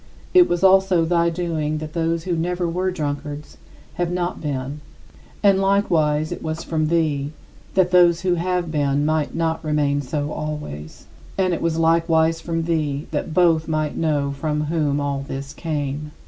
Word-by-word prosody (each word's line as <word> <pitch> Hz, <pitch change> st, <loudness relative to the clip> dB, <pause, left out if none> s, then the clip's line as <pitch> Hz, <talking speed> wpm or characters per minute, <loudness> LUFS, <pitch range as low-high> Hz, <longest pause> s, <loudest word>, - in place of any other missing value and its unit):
It 360 Hz, -1 st, +6 dB
was 175 Hz, +1 st, 0 dB
also 190 Hz, -3 st, +5 dB
thy 170 Hz, 0 st, +2 dB
doing 160 Hz, -3 st, -2 dB
that 155 Hz, 0 st, -6 dB
those 165 Hz, -1 st, 0 dB
who 175 Hz, -1 st, -1 dB
never 175 Hz, +2 st, -1 dB
were 180 Hz, +3 st, -1 dB
drunkards 150 Hz, -3 st, -5 dB, 0.4 s
have 175 Hz, -, +1 dB
not 180 Hz, 0 st, -2 dB
been 140 Hz, -1 st, -4 dB, 0.6 s
and 195 Hz, -1 st, +5 dB
likewise, 165 Hz, -6 st, +2 dB
it -, -, -5 dB
was 160 Hz, 0 st, -4 dB
from 155 Hz, -2 st, -1 dB
thee 155 Hz, -3 st, 0 dB, 0.4 s
that 185 Hz, -1 st, +3 dB
those 175 Hz, -2 st, +5 dB
who 185 Hz, -1 st, +1 dB
have 175 Hz, -1 st, -1 dB
been 145 Hz, -1 st, +1 dB
might 155 Hz, -1 st, 0 dB
not 165 Hz, 0 st, -1 dB
remain 145 Hz, -2 st, +1 dB
so 145 Hz, +2 st, -3 dB
always. 150 Hz, -, -6 dB, 0.3 s
And 185 Hz, -2 st, +2 dB
it -, -, -2 dB
was 165 Hz, -1 st, 0 dB
likewise 165 Hz, 0 st, +2 dB
from 165 Hz, -1 st, -2 dB
thee 155 Hz, -3 st, -1 dB
that 155 Hz, +1 st, -3 dB
both 165 Hz, -3 st, +3 dB
might 155 Hz, -2 st, -1 dB
know 145 Hz, -3 st, 0 dB
from 150 Hz, +2 st, -2 dB
whom 150 Hz, -2 st, 0 dB
all 140 Hz, -1 st, -2 dB
this 140 Hz, +1 st, -6 dB
came. 150 Hz, -2 st, -3 dB
160 Hz, 165 wpm, -22 LUFS, 150-170 Hz, 0.6 s, It